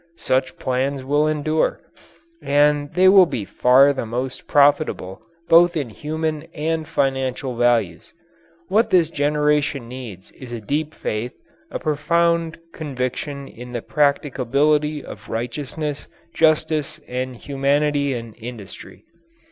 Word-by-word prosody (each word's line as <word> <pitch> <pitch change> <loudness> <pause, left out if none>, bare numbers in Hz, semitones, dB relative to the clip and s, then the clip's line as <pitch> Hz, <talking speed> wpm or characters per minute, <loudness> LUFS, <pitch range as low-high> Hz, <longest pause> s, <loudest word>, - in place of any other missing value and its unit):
Such 130 0 -1
plans 130 +1 -1
will 145 +3 +2
endure 155 +1 0 0.6
and 145 0 +2
they 185 +1 +5
will 190 -1 +7
be 110 -10 -4
far 130 +7 +5
the 135 - -3
most 125 +3 -4
profitable 145 -10 +2 0.3
both 170 +1 +5
in 135 -7 -3
human 155 +4 -3
and 160 0 -2
financial 135 -1 -1
values. 115 -8 +1 0.6
What 220 +4 +2
this 175 -5 +3
generation 150 -3 +1
needs 115 -7 -9
is 130 -3 -12
a 120 - -4
deep 150 +8 -3
faith, 110 +3 -3 0.4
a - - -4
profound 170 +1 +1 0.2
conviction 140 0 -4
in 125 0 -11
the 120 - -4
practicability 145 +1 +1
of - - -11
righteousness, 140 +6 -4 0.3
justice, 155 -1 +1
and 125 0 -4
humanity 140 +1 0
in 115 -2 -7
industry. 115 -4 -10
145 Hz, 120 wpm, -21 LUFS, 125-155 Hz, 0.6 s, will